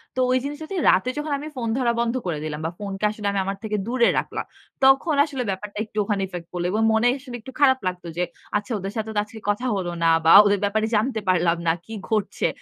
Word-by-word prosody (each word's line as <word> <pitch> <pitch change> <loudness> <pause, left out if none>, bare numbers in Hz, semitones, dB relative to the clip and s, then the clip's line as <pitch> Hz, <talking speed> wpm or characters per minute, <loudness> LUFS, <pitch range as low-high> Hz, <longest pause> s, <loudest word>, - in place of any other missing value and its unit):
তো 255 - -2
ওই 255 - +4
জিনিসটাতে 305 +6 -5
রাতে 190 +7 +3
যখন 295 0 -3
আমি 300 - -7
ফোন 235 -2 -3
ধরা 240 -3 +2
বন্ধ 235 0 +1
করে 165 -4 -2
দিলাম, 155 -1 -4
বা 165 - -1
ফোন 205 -1 -5
কে 215 - 0
আসলে 210 -1 -5
আমি 200 - -1
আমার 195 0 -3
থেকে 215 -1 -1
দূরে 240 -1 +3
রাখলাম। - - -4 0.4
তখন 270 +4 +5
আসলে 275 -5 -4
ব্যাপারটা 200 +2 -5
একটু 215 - -15
ওখানে 200 -1 -1
ইফেক্ট 175 -2 -8
পড়ল 175 -1 -3
এবং 220 +2 0
মনে 220 +2 +3
আসলে 255 -3 -9
একটু 265 - -10
খারাপ 260 -2 +5
লাগতো 180 -1 -4
যে, 180 - +1 0.3
"আচ্ছা 205 +3 -6
ওদের 195 +1 -5
সাথে 220 0 -3
তো - - +3
আজকে 220 +1 -11
কথা 210 +5 0
হলো 180 -3 -2
না 165 - +5 0.2
বা 165 - +6
ওদের 205 -1 +3
ব্যাপারে 215 +2 0
জানতে 225 +2 +1
পারলাম 170 -1 +3
না, - - +5
কি 225 - -9 0.2
ঘটছে?" 215 -2 0
215 Hz, 240 wpm, -23 LUFS, 190-255 Hz, 0.4 s, বা